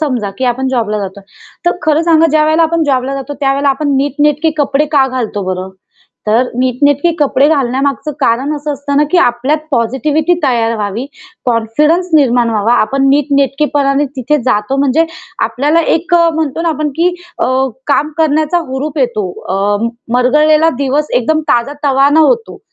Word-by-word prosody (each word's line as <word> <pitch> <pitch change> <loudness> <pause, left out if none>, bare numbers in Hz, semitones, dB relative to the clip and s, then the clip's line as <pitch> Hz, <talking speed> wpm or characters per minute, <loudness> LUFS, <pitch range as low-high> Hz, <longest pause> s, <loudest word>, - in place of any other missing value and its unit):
समजा 250 -10 -2
की 260 - -1
आपण 255 +2 -1
जॉबला 225 -5 -1
जातो. 195 0 -6 0.5
तर 350 - +5
खरं 310 +1 +2
सांगा 330 -1 +4
ज्यावेळेला 310 +1 +3
आपण 330 0 +1
जॉबला 265 0 0
जातो, 275 +1 -6
त्यावेळेला 275 +1 +1
आपण 275 0 0
नीटनेटके 290 +3 +1
कपडे 285 +1 +1
का 275 -3 +4
घालतो 235 -5 -3
बरं? 185 +1 -6 0.6
तर 230 +4 +2
नीटनेटके 285 +5 +1
कपडे 285 -1 +2
घालण्यामागचं 275 0 -1
कारण 265 +5 +1
असं 295 +1 -4
असतं 285 0 -3
ना 295 - +4
की 365 - +3
आपल्यात 255 +2 +1
पॉझिटिव्हिटी 290 +7 0
तयार 230 -2 +1
व्हावी, 210 +4 -3 0.4
कॉन्फिडन्स 295 +10 +1
निर्माण 245 -5 +3
व्हावा. 220 +2 +1
आपण 275 +5 +1
नीटनेटकेपणाने 280 0 +1
तिथे 275 +4 0
जातो 240 +1 0
म्हणजे 280 +3 +2 0.4
आपल्याला 285 +9 +1 0.2
एक 345 +2 -2
अ, 340 -1 +4
म्हणतो 320 0 -2
ना 340 - 0
आपण, 305 -1 -1
की 350 +2 +1 0.2
अ, - - 0 0.4
काम 295 +1 +1
करण्याचा 315 +2 +1
हुरूप 285 +3 -4
येतो. 215 -7 -1 0.2
अ, 205 +4 0 0.3
मरगळलेला 300 +5 +3
दिवस 280 +2 -1
एकदम 310 +6 +1
ताजातवाना 280 +3 +2
होतो, 460 +8 +1
275 Hz, 155 wpm, -13 LUFS, 245-305 Hz, 0.6 s, तर